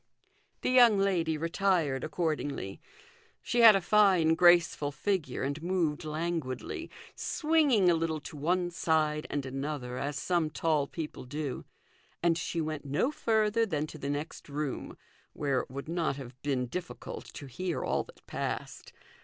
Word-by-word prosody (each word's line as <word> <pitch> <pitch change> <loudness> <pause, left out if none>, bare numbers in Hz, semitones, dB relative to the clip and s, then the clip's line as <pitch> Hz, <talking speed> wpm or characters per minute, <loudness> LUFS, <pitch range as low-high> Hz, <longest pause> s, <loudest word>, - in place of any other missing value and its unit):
The - - 0
young 240 -4 +7
lady 175 -5 +1
retired 165 -5 +1
accordingly. 150 - -2 0.6
She 240 - 0
had 225 -3 +10
a 195 - +2
fine, 185 -4 +4
graceful 175 -4 +4
figure, 150 -2 -2
and 140 +3 -2
moved 170 -3 0
languidly, 165 - -3 0.2
swinging 300 - +2
a 175 - +6
little 165 -1 -1
to 150 - -9
one 175 +4 0
side 155 -3 +1
and 145 -2 -2
another 135 -2 -4
as 145 0 -3
some 170 +1 0
tall 155 -2 0
people 155 -5 -6
do; 145 0 -4 0.6
and 170 -1 +4
she 170 0 -3
went 155 -2 -3
no 145 - 0
further 220 -4 +2
than 155 -9 -1
to 155 0 -10
the 140 - -4
next 145 +1 -5
room, 145 -1 -4 0.4
where 140 -3 0
it - - -6
would 140 +3 -7
not 165 -3 0
have 135 -3 -8
been 135 -3 0
difficult 175 +8 -6
to 145 - -7
hear 175 +7 -3
all - - 0
that - - -18
passed. - - -5
160 Hz, 155 wpm, -30 LUFS, 145-180 Hz, 0.6 s, had